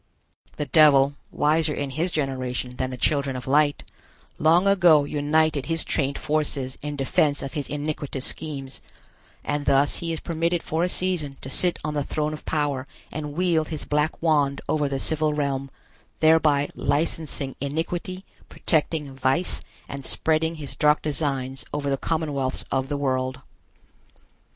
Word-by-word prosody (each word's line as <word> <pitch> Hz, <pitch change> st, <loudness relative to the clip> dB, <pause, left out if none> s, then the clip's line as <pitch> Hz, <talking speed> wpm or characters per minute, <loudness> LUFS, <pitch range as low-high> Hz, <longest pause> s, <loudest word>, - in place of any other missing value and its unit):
The 150 Hz, -, -2 dB
Devil, 145 Hz, -3 st, +6 dB, 0.2 s
wiser 155 Hz, +1 st, +2 dB
in 140 Hz, -1 st, -3 dB
his 160 Hz, +7 st, -1 dB
generation 130 Hz, -4 st, -3 dB
than 130 Hz, -, -1 dB
the 125 Hz, -, -6 dB
children 140 Hz, -1 st, +1 dB
of 125 Hz, -, -5 dB
light, 145 Hz, +1 st, +2 dB, 0.6 s
long 165 Hz, +4 st, +4 dB
ago 175 Hz, -7 st, +6 dB
united 150 Hz, 0 st, +1 dB
his 165 Hz, 0 st, 0 dB
trained 140 Hz, -2 st, 0 dB
forces 145 Hz, -4 st, -1 dB
in 150 Hz, 0 st, -4 dB
defense 145 Hz, +1 st, +1 dB
of 135 Hz, -, -5 dB
his 145 Hz, -3 st, -3 dB
iniquitous 145 Hz, -2 st, -3 dB
schemes, 140 Hz, -4 st, -4 dB, 0.6 s
and 145 Hz, 0 st, -2 dB
thus 140 Hz, +1 st, +4 dB
he 170 Hz, -1 st, -3 dB
is 165 Hz, -, -3 dB
permitted 170 Hz, +1 st, -1 dB
for 160 Hz, +2 st, -1 dB
a 180 Hz, -, +1 dB
season 175 Hz, -8 st, 0 dB
to 135 Hz, -, -6 dB
sit 180 Hz, +3 st, +2 dB
on 150 Hz, -, -2 dB
the 145 Hz, -1 st, 0 dB
throne 150 Hz, +2 st, -2 dB
of 155 Hz, -, -9 dB
power 145 Hz, -4 st, -1 dB, 0.2 s
and 150 Hz, -1 st, -5 dB
wield 165 Hz, -2 st, +1 dB
his 155 Hz, -2 st, -5 dB
black 150 Hz, +1 st, 0 dB
wand 145 Hz, -4 st, +2 dB
over 150 Hz, -2 st, +1 dB
the 135 Hz, -, -1 dB
civil 155 Hz, +1 st, 0 dB
realm, 140 Hz, -2 st, -1 dB, 0.5 s
thereby 155 Hz, -3 st, +4 dB
licensing 150 Hz, -3 st, -2 dB
iniquity, 170 Hz, +6 st, -3 dB, 0.2 s
protecting 150 Hz, -3 st, 0 dB
vice, 135 Hz, +7 st, +1 dB, 0.3 s
and 140 Hz, 0 st, -6 dB
spreading 160 Hz, +3 st, +1 dB
his 145 Hz, -3 st, -7 dB
dark 150 Hz, -1 st, +3 dB
designs 135 Hz, -3 st, -2 dB
over 145 Hz, -1 st, -2 dB
the -, -, +3 dB
commonwealths 145 Hz, -4 st, -1 dB
of 135 Hz, 0 st, 0 dB
the 145 Hz, -, -1 dB
world. 130 Hz, -2 st, -1 dB
150 Hz, 155 wpm, -24 LUFS, 135-160 Hz, 0.6 s, Devil